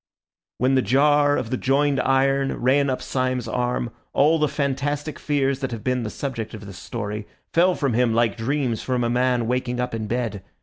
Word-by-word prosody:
When 130 Hz, +2 st, +2 dB
the 130 Hz, -, +4 dB
jar 145 Hz, +5 st, +3 dB
of 115 Hz, -, -3 dB
the 130 Hz, -, 0 dB
joined 140 Hz, +2 st, +2 dB
iron 135 Hz, +1 st, +2 dB
ran 135 Hz, +3 st, +3 dB
up 130 Hz, -, -2 dB
Syme's 130 Hz, -2 st, -1 dB
arm, 125 Hz, -1 st, -1 dB, 0.2 s
all 155 Hz, +3 st, +4 dB
the 150 Hz, -, +3 dB
fantastic 145 Hz, +2 st, -2 dB
fears 140 Hz, -2 st, 0 dB
that 135 Hz, -2 st, -2 dB
have 115 Hz, -3 st, -6 dB
been 125 Hz, -1 st, 0 dB
the 110 Hz, -, -3 dB
subject 115 Hz, -3 st, -5 dB
of 105 Hz, -1 st, -10 dB
this 100 Hz, -2 st, -9 dB
story 105 Hz, -2 st, -5 dB, 0.3 s
fell 180 Hz, +2 st, +4 dB
from 140 Hz, -5 st, 0 dB
him 120 Hz, 0 st, +2 dB
like 115 Hz, -2 st, +2 dB
dreams 120 Hz, -1 st, -1 dB
from 125 Hz, -2 st, -1 dB
a 120 Hz, -, 0 dB
man 125 Hz, -1 st, +1 dB
waking 125 Hz, +1 st, -1 dB
up 125 Hz, -1 st, -2 dB
in 110 Hz, -1 st, -3 dB
bed. 115 Hz, -4 st, -2 dB
130 Hz, 200 wpm, -23 LUFS, 120-140 Hz, 0.3 s, the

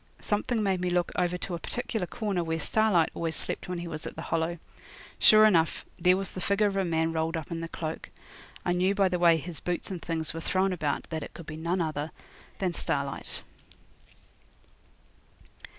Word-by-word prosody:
Something 215 Hz, +2 st, 0 dB
made 190 Hz, -3 st, +1 dB
me 180 Hz, -, 0 dB
look 175 Hz, -1 st, +1 dB
over 180 Hz, 0 st, +1 dB
to 180 Hz, -, -4 dB
a 170 Hz, -, -2 dB
particular 220 Hz, -2 st, -3 dB
corner 200 Hz, -5 st, -1 dB
where 165 Hz, 0 st, -1 dB
Starlight 210 Hz, -4 st, +3 dB
always 165 Hz, -1 st, -1 dB
slept -, -, -1 dB
when 180 Hz, -, -2 dB
he 170 Hz, 0 st, -5 dB
was 155 Hz, -1 st, -5 dB
at -, -, -7 dB
the -, -, -6 dB
Hollow. 165 Hz, +1 st, 0 dB, 0.6 s
Sure 215 Hz, 0 st, +8 dB
enough 170 Hz, -6 st, +3 dB
there 180 Hz, 0 st, +5 dB
was 195 Hz, 0 st, -1 dB
the 185 Hz, -, -6 dB
figure 200 Hz, +3 st, +2 dB
of 200 Hz, -1 st, +1 dB
a 195 Hz, -, +2 dB
man 165 Hz, -2 st, +1 dB
rolled 165 Hz, +1 st, 0 dB
up 160 Hz, +1 st, -6 dB
in 165 Hz, 0 st, -3 dB
a -, -, -3 dB
cloak. 160 Hz, -1 st, -5 dB, 0.6 s
I 175 Hz, -, +2 dB
knew 185 Hz, +3 st, +2 dB
by 195 Hz, -2 st, +4 dB
the 180 Hz, -1 st, -1 dB
way 170 Hz, -1 st, +6 dB
his 165 Hz, -1 st, -6 dB
boots 180 Hz, +2 st, -2 dB
and 180 Hz, -3 st, -4 dB
things 160 Hz, -2 st, -2 dB
were 165 Hz, -, -5 dB
thrown 185 Hz, +2 st, +1 dB
about 150 Hz, -5 st, -1 dB
that 160 Hz, -1 st, -2 dB
it -, -, -8 dB
could 170 Hz, -, -9 dB
be 155 Hz, -, -6 dB
no 165 Hz, +2 st, -2 dB
other 150 Hz, 0 st, -3 dB, 0.5 s
than 185 Hz, -3 st, 0 dB
Starlight. 140 Hz, -4 st, -3 dB
175 Hz, 200 wpm, -28 LUFS, 160-190 Hz, 0.6 s, Sure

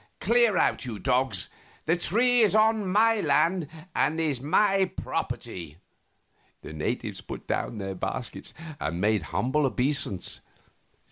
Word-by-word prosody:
Clear 230 Hz, -2 st, +3 dB
out, -, -, +2 dB
you 120 Hz, -5 st, -5 dB
dogs; 125 Hz, -5 st, 0 dB, 0.4 s
the 165 Hz, -, +3 dB
tree 240 Hz, +7 st, +2 dB
is 210 Hz, -2 st, +4 dB
on 215 Hz, -1 st, +3 dB
my 225 Hz, +2 st, +4 dB
lands 170 Hz, -2 st, +2 dB, 0.3 s
and 155 Hz, +3 st, +1 dB
is 150 Hz, -6 st, 0 dB
my 195 Hz, +6 st, +3 dB
property." 85 Hz, -4 st, -4 dB, 0.9 s
The -, -, -8 dB
natives 75 Hz, -, -3 dB
put -, -, -8 dB
down 115 Hz, -, -2 dB
their 95 Hz, -1 st, -4 dB
baskets 90 Hz, -, -5 dB, 0.2 s
and 85 Hz, +2 st, -3 dB
made 105 Hz, +1 st, +2 dB
humble 140 Hz, +5 st, +1 dB
obeisance. 130 Hz, -7 st, -1 dB
150 Hz, 130 wpm, -27 LUFS, -, 0.9 s, is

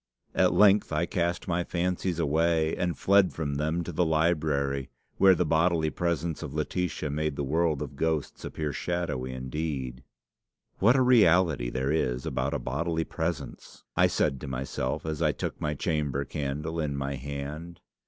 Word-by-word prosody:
At -, -, +3 dB
length 105 Hz, 0 st, +5 dB
I -, -, +1 dB
cast 85 Hz, +1 st, -1 dB
my 90 Hz, 0 st, 0 dB
fancies 90 Hz, 0 st, -1 dB
away, 80 Hz, 0 st, +2 dB
and 90 Hz, -1 st, -1 dB
fled 100 Hz, -1 st, +4 dB
from 75 Hz, -3 st, -3 dB
them 80 Hz, +4 st, 0 dB
to 90 Hz, -, -5 dB
the 90 Hz, +2 st, +1 dB
library, 75 Hz, -4 st, +1 dB, 0.3 s
where 95 Hz, -1 st, +6 dB
the 90 Hz, -, +1 dB
bodily 80 Hz, 0 st, +2 dB
presence 85 Hz, -2 st, -2 dB
of 75 Hz, -3 st, -6 dB
Laetitia 80 Hz, -1 st, -2 dB
made 75 Hz, 0 st, -1 dB
the 70 Hz, -, -2 dB
world 80 Hz, +1 st, +1 dB
of -, -, -8 dB
ghosts 80 Hz, -3 st, -2 dB
appear 75 Hz, -2 st, -3 dB
shadowy 75 Hz, -8 st, -2 dB
indeed. 65 Hz, -1 st, -4 dB, 0.8 s
"'What 115 Hz, +6 st, +5 dB
a 130 Hz, -, +4 dB
reality 90 Hz, -, +4 dB
there 65 Hz, +2 st, -1 dB
is 65 Hz, -5 st, 0 dB
about -, -, -1 dB
a -, -, +1 dB
bodily 80 Hz, +5 st, -1 dB
presence!' 80 Hz, -3 st, -5 dB
I -, -, +5 dB
said 65 Hz, -, 0 dB
to 75 Hz, -, -6 dB
myself, 65 Hz, +2 st, -3 dB
as 80 Hz, -2 st, -3 dB
I -, -, +3 dB
took -, -, -5 dB
my 75 Hz, 0 st, -1 dB
chamber 75 Hz, -3 st, -1 dB
candle 75 Hz, +4 st, -3 dB
in 75 Hz, -3 st, -1 dB
my 70 Hz, 0 st, -2 dB
hand. 70 Hz, +5 st, -6 dB
80 Hz, 165 wpm, -28 LUFS, 70-85 Hz, 0.8 s, where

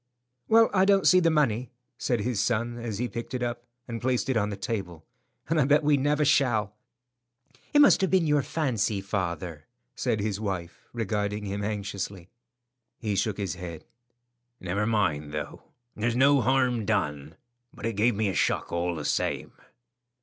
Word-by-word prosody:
"Well, 225 Hz, 0 st, +5 dB
I 190 Hz, -1 st, +4 dB
don't 195 Hz, -1 st, +4 dB
see 185 Hz, -, +7 dB
the 170 Hz, -2 st, +3 dB
money," 130 Hz, -6 st, +1 dB, 0.3 s
said 120 Hz, -4 st, 0 dB
his 120 Hz, -1 st, -1 dB
son 120 Hz, 0 st, -1 dB
as 115 Hz, -4 st, -4 dB
he 125 Hz, +3 st, -1 dB
picked 120 Hz, +2 st, -6 dB
it 125 Hz, -, -2 dB
up 120 Hz, 0 st, -4 dB, 0.2 s
and 115 Hz, -1 st, -5 dB
placed 130 Hz, +1 st, 0 dB
it 130 Hz, -, +1 dB
on 105 Hz, -2 st, +1 dB
the 100 Hz, -, -5 dB
table, 95 Hz, -6 st, -4 dB, 0.4 s
"and 160 Hz, -1 st, +2 dB
I -, -, +3 dB
bet 145 Hz, +2 st, +4 dB
I 150 Hz, -, +5 dB
never 145 Hz, +2 st, +1 dB
shall." 120 Hz, -8 st, +2 dB, 1.0 s
"It 295 Hz, -, +6 dB
must 285 Hz, -, +6 dB
have 190 Hz, -, +2 dB
been 185 Hz, -3 st, +3 dB
your 150 Hz, -2 st, +3 dB
fancy, 120 Hz, -10 st, -1 dB
father," 85 Hz, -5 st, -4 dB, 0.3 s
said 120 Hz, -4 st, -1 dB
his 105 Hz, -1 st, -2 dB
wife, 95 Hz, -5 st, -5 dB
regarding 105 Hz, -2 st, -2 dB
him 100 Hz, +1 st, -3 dB
anxiously. 100 Hz, -3 st, -4 dB, 0.7 s
He 105 Hz, -4 st, -2 dB
shook 100 Hz, +1 st, 0 dB
his 100 Hz, -2 st, -2 dB
head. 85 Hz, -3 st, -8 dB, 0.7 s
"Never 100 Hz, +4 st, -1 dB
mind, 80 Hz, -10 st, 0 dB
though; 75 Hz, -1 st, -6 dB, 0.3 s
there's 115 Hz, +2 st, -1 dB
no 140 Hz, +2 st, +5 dB
harm 125 Hz, -1 st, +2 dB
done, 75 Hz, -5 st, -2 dB, 0.4 s
but -, -, -9 dB
it 115 Hz, -, -1 dB
gave 110 Hz, +3 st, +2 dB
me 110 Hz, +1 st, 0 dB
a 95 Hz, -, -1 dB
shock -, -, 0 dB
all 85 Hz, 0 st, -1 dB
the 75 Hz, -2 st, -5 dB
same." -, -, -1 dB
110 Hz, 175 wpm, -27 LUFS, 100-130 Hz, 1.0 s, see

